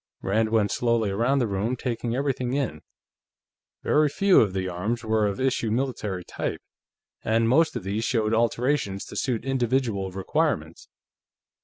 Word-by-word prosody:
Rand 110 +3 +1
went 110 -2 +2
slowly 115 -4 +1
around 120 +8 +1
the 125 -4 +1
room, 105 +5 -1
taking 120 -1 -3
everything 130 -2 -1
in. 130 - -2 1.0
Very 150 0 +3
few 195 +5 +4
of 100 -4 +1
the 95 -1 -2
arms 100 +7 -3
were 110 -1 +2
of 100 - -3
issue 130 -3 0
military 110 -6 -2
type, - - -4 0.6
and 115 +1 +2
most 160 +6 +3
of 120 - -4
these 100 +4 -2
showed 110 -2 +1
alterations 115 -2 0
to - - -10
suit 125 -3 -1
individual 120 -6 0
requirements. 95 +1 -2
115 Hz, 150 wpm, -25 LUFS, 100-130 Hz, 1.0 s, few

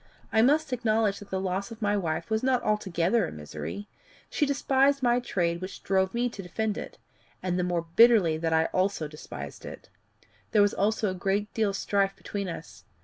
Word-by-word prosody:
I 220 - +5
must 290 +3 +3
acknowledge 220 -4 +1
that 205 - -12
the 190 - -2
loss 190 +1 -2
of 230 -1 -10
my 205 -2 +1
wife 170 +1 -2
was 220 0 +1
not 255 -2 +1
altogether 200 -1 +1
a - - -7
misery. 75 +6 -7 0.4
She 295 - +1
despised 275 0 +2
my 240 0 +4
trade, 170 -7 -1
which 185 +1 -7
drove 190 +1 +1
me 240 +1 +1
to 210 - -8
defend 210 +4 -2
it - - -7 0.5
and 180 -1 0
the - - +1
more 175 -2 0
bitterly 225 -9 +6
that 165 0 -1
I 160 0 +3
also 185 -4 0
despised 150 0 -9
it. - - -10 0.6
There 210 - +6
was 205 - +3
therefore 210 +1 +1
a - - -3
good 195 +3 -1
deal 220 -2 +1
of 195 - -3
strife 195 0 0
between 200 -2 -5
us. 170 - -9
200 Hz, 200 wpm, -27 LUFS, 180-225 Hz, 0.6 s, bitterly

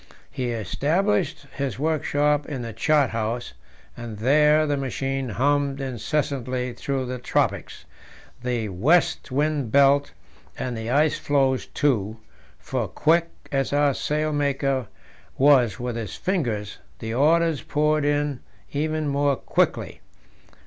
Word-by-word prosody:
He 125 -2 -3
established 155 - 0
his 135 -5 -3
workshop 150 -1 +1
in 135 -5 -4
the 115 -1 -6
chart 145 +4 +2
house, 115 +2 -3 0.4
and 115 -3 -7
there 150 +6 +4
the 145 -1 0
machine 135 -1 -2
hummed 140 +4 +1
incessantly 130 -1 -2
through 135 0 -3
the 125 0 -5
tropics, - - -1 0.6
the 120 -3 -2
west 140 - +2
wind 145 -3 0
belt, 140 0 +4 0.5
and 125 -2 -3
the 110 0 -5
ice 150 +4 +2
floes 135 -2 +1
too; 110 -7 0 0.4
for, - - -3
quick 170 +2 +2 0.2
as 135 0 0
our 145 -1 +3
sailmaker 140 -4 -1 0.5
was 130 -7 +4
with 120 -1 -3
his 110 -6 -5
fingers, 120 - -2 0.2
the 110 0 -5
orders 160 +3 +3
poured 150 0 +1
in 145 -2 0 0.3
even 155 +1 -1
more 140 0 +2
quickly. - - -1
140 Hz, 120 wpm, -24 LUFS, 125-150 Hz, 0.6 s, there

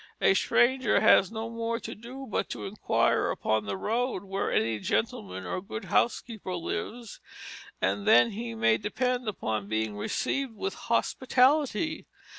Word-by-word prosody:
A - - +5
stranger 255 -1 +3
has 195 - +5
no 220 0 -4
more 230 0 -3
to 225 - -7
do 250 +5 -9
but 215 - -2
to - - -5
inquire 200 +2 +1
upon 110 -1 0
the 100 -1 -3
road 230 - -1
where 195 0 -2
any 110 -1 +1
gentleman 95 -3 -2
or 90 - -3
good 220 +3 -7
housekeeper 220 -5 0
lives, 215 +6 -5 0.6
and 200 +1 -1
then 225 +1 +6
he 230 +2 -5
may 115 - +3
depend 250 +3 -1
upon 110 - -2
being 110 -1 -1
received 245 - -2
with 395 - -3
hospitality. 275 +3 +1
220 Hz, 145 wpm, -28 LUFS, -, 0.6 s, then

